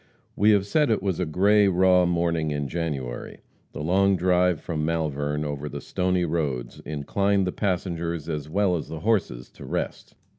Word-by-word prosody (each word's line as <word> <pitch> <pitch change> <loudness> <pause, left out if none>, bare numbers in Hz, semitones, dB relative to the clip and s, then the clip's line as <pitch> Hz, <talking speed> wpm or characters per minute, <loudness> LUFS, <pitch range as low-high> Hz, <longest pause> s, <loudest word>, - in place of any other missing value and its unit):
We 105 +2 +3
have 100 -2 +4
said 150 +8 +2
it 110 -4 +1
was 95 -4 -1
a 90 - -1
gray, 100 +6 +4
raw 90 -1 +4
morning 85 -2 0
in 75 -1 -2
January. 70 -7 -4 0.3
The 75 - -6
long 95 +4 +3
drive 90 -2 +2
from 80 -2 -3
Malvern 75 -2 -1
over 75 0 -4
the - - -6
stony 90 -1 0
roads 70 -7 -2
inclined 95 +7 0
the 90 - -1
passengers, 85 -5 -2
as 75 -2 -4
well 95 +1 +2
as 80 - -6
the 80 -1 -6
horses, 95 - -1
to - - -13
rest. - - -4
85 Hz, 175 wpm, -25 LUFS, 75-95 Hz, 0.3 s, have